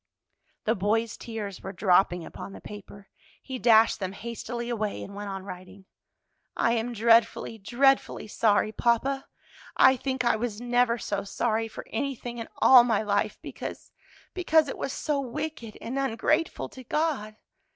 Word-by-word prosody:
The 220 - +2
boy's 220 +2 0
tears 210 -5 -6
were 195 - -6
dropping 180 -2 +2
upon 195 - -9
the - - -9
paper. 200 -1 -11 0.3
He 260 -1 -7
dashed 225 -1 +5
them 190 -1 -3
hastily 235 +2 -5
away, 215 -4 -2
and 200 - -9
went 205 0 -6
on 195 -1 -5
writing. 185 0 -10 0.7
"I 230 - +2
am 235 +1 -1
dreadfully, 230 0 +3
dreadfully 265 +3 +2
sorry, 215 0 +2
papa! 250 +5 0 0.5
I 260 - +7
think 260 0 -2
I 235 - +3
was 220 -2 -3
never 245 -1 +2
so 205 -3 -3
sorry 225 +2 -1
for 220 - -9
anything 240 -1 -3
in 230 - -5
all 255 -2 +8
my 225 -3 +1
life, 205 -1 0
because - - -7 0.4
because 320 -4 +3
it - - -5
was 275 - -2
so 295 0 -1
wicked 250 -3 -5
and 260 +4 -3
ungrateful 270 +5 0
to 260 - -11
God. 265 -7 -1
230 Hz, 155 wpm, -27 LUFS, 205-250 Hz, 0.7 s, all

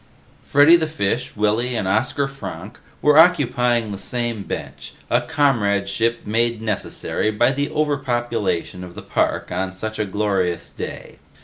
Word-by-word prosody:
Freddy 145 +4 +6
the 160 -2 +1
Fish, 125 -4 -2
Willy 110 +4 +1
and 105 -4 -1
Oscar 120 +7 +1
Fronk 135 0 -8 0.2
were 150 +1 +6
occupying 125 -9 +3
the 100 - -6
same 120 -2 -3
bench, - - -7 0.2
a - - +4
comradeship 115 -6 +1
made 115 +2 0
necessary 110 0 -2
by 120 +4 +2
the 145 +1 -1
overpopulation 120 - -1
of 90 -1 -10
the - - -8
park - - -1
on 95 +1 -2
such 110 +3 -5
a 105 - +1
glorious 95 -3 -1
day. - - -8
115 Hz, 140 wpm, -21 LUFS, 105-135 Hz, 0.2 s, Freddy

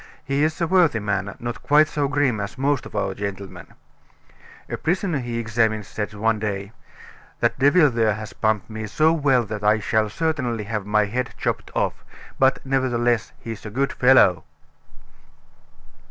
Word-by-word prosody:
He 140 +1 0
is 155 +2 0
a 170 - +1
worthy 165 -8 +3
man, 100 -1 -2
not 120 0 -5
quite 150 +1 +4
so 145 -2 -1
grim 135 -5 +1
as 100 +5 -5
most 140 0 0
of - - -13
our 100 -2 -1
gentlemen. 100 -1 -6 1.0
A - - -3
prisoner 175 -2 -1
he 120 -2 -5
had - - -1
examined 110 -2 0
said 105 +1 -5
one 110 +1 +1
day: 100 -1 -4 0.7
'That - - 0
devil 145 +4 +5
there 110 -3 +1
has 110 -1 -8
pumped 110 -2 0
me 110 -1 -6
so 155 +9 +3
well 140 -6 +2
that 105 -1 -6
I 105 +1 +4
shall 110 +1 0
certainly 130 -5 -2
have 105 -1 -4
my 105 0 +3
head 125 +5 -3
chopped - - -2
off; - - -1 0.4
but, 135 +1 +2
nevertheless, 120 -3 0
he's 115 -5 -7
a 105 - -6
good 135 +6 -1
fellow!" 105 -10 +5
115 Hz, 170 wpm, -22 LUFS, 105-140 Hz, 1.0 s, devil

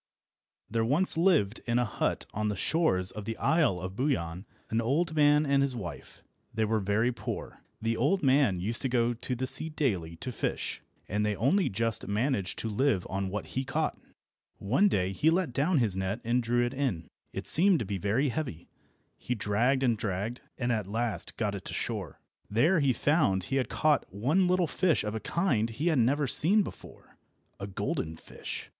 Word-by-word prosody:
THERE 115 +1 0
once 150 +11 +3
lived 160 - +2
in 120 0 +2
a 125 - +2
hut 110 - -2
on 105 +1 -1
the 105 - -2
shores 95 - +1
of 105 -2 -7
the 115 - -4
Isle 155 - +2
of 95 +1 -6
Buyan 95 - -2 0.2
an 115 +1 +1
old 155 +8 0
man 150 0 +4
and 140 -1 +3
his 140 -2 0
wife. 85 -10 -8 0.3
They 110 0 0
were 110 +1 +1
very 105 +5 +1
poor. - - -6 0.2
The 115 +1 -1
old 150 +10 +1
man 130 -8 +3
used 110 +6 -1
to 135 - 0
go 120 -1 +2
to 125 +2 -3
the 130 +2 -2
sea 135 +5 -2
daily 100 - -1
to 125 - -5
fish, - - -3 0.3
and 105 +2 -1
they 105 -1 0
only 165 - +2
just 115 +2 -1
managed 105 -2 -1
to - - -3
live 110 -3 +1
on 95 0 -2
what 105 +2 -5
he 130 - -1
caught. 150 +4 -1 0.6
One 130 - +2
day 95 - 0
he 155 +11 +3
let 165 -5 +1
down 150 +7 +2
his 110 -7 +1
net 95 +3 -2
and 120 +2 +1
drew 120 +1 +1
it 120 - -3
in. 125 - -2 0.2
It - - -5
seemed 185 +2 +5
to 115 - -3
be 100 0 -3
very 110 +9 +1
heavy. 120 - -4 0.5
He 125 - -2
dragged 120 +6 +1
and 120 -3 +3
dragged, 105 +4 -3 0.2
and 120 -1 -1
at 110 -4 -1
last 110 -3 -3
got - - -1
it - - -6
to - - -5
shore. - - -3 0.3
There 155 - +3
he 140 -3 +3
found 125 - +2
that - - -6
he 135 - +1
had 130 - 0
caught 150 -9 +1
one 140 - +2
little 180 0 +3
fish 170 0 +1
of 105 0 -3
a 110 - -2
kind 120 - 0
he 145 +10 -1
had 155 -6 +2
never 135 +6 +2
before 190 - 0
seen—a 100 - -12
golden 80 -4 -3
fish. - - -7
120 Hz, 200 wpm, -29 LUFS, 105-145 Hz, 0.6 s, seemed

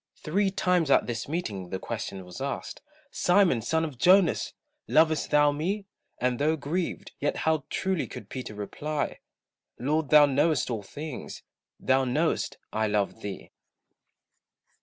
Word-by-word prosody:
Three 195 +6 +1
times 180 -5 +1
at 135 - +5
this 115 -2 -4
meeting 105 - -3
the 95 - -2
question 100 -2 -5
was 90 +7 -9
asked, 140 0 -4 0.3
"Simon, 180 - +3
son 160 +6 0
of 140 -6 -8
Jonas, 185 +2 +4 0.4
lovest 160 -1 +3
thou 145 0 +5
me?" 185 +8 -2 0.3
And 125 -1 0
though 155 +2 +2
grieved, 160 +4 -3
yet 145 - 0
how 160 -3 +2
truly 190 -4 -1
could - - -9
Peter 125 -5 -6
reply, 145 +9 -3 0.6
"Lord 150 +4 0
thou 150 -1 +8
knowest 145 -1 +1
all 110 -3 -2
things, 145 +7 -7 0.4
thou 130 0 +3
know'st 125 -1 0 0.2
I 110 0 +1
love 105 +1 -1
thee." 100 -2 -7
145 Hz, 140 wpm, -27 LUFS, 120-160 Hz, 0.6 s, thou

